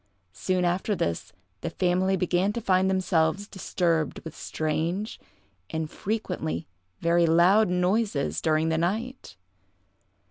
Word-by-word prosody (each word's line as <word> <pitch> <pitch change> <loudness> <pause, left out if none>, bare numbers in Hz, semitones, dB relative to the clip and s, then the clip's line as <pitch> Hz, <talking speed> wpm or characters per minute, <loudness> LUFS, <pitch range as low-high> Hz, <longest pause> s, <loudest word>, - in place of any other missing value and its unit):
Soon 185 - 0
after 185 +4 0
this, 85 - -2 0.3
the - - -2
family 185 +2 +1
began 180 +2 +1
to 235 - -2
find 190 -3 +2
themselves 185 0 +1
disturbed 170 -6 -1
with 160 - -8
strange, 165 +7 -2 0.5
and 160 -1 -3
frequently 190 -6 -3 0.4
very 170 0 +3
loud, 180 +6 +5
noises 180 - 0
during 155 +1 +2
the 160 0 +1
night. 225 +10 -3
180 Hz, 115 wpm, -26 LUFS, 160-195 Hz, 0.5 s, loud